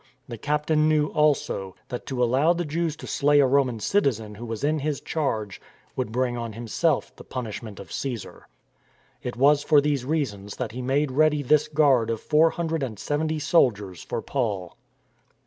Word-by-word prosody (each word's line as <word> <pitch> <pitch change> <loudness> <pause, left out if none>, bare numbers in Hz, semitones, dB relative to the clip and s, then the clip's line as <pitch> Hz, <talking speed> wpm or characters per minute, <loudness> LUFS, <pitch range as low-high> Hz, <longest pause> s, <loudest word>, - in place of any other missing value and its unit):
The 115 - -7
captain 150 +2 +1
knew, 150 -1 +2
also, 140 -10 0
that 125 - -6
to 125 -2 0
allow 135 +8 +3
the 175 0 -3
Jews 160 +1 -1
to - - -10
slay 145 0 +3
a 140 - +6
Roman 130 -3 +2
citizen 115 - 0
who 115 +3 -8
was 115 +1 -5
in 155 +2 +1
his 145 -1 -2
charge 110 -10 -3 0.3
would 125 -4 -2
bring 125 +1 0
on 115 -2 -5
himself 115 +1 -1
the - - -12
punishment 115 -4 -6
of - - -11
Caesar. 125 -5 -5 0.7
It 125 - -5
was 140 +3 +4
for 150 -1 +5
these 145 -3 0
reasons 125 -9 -2
that 125 -4 -4
he 125 +3 -6
made 135 +3 0
ready 150 +1 +3
this 150 +3 +3
guard 140 -7 +3
of 115 -1 -1
four 155 +5 +4
hundred 165 -1 -2
and 120 -6 -4
seventy 155 +7 -1
soldiers 105 - +1
for - - -4
Paul. 105 -10 -2
135 Hz, 180 wpm, -25 LUFS, 115-150 Hz, 0.7 s, a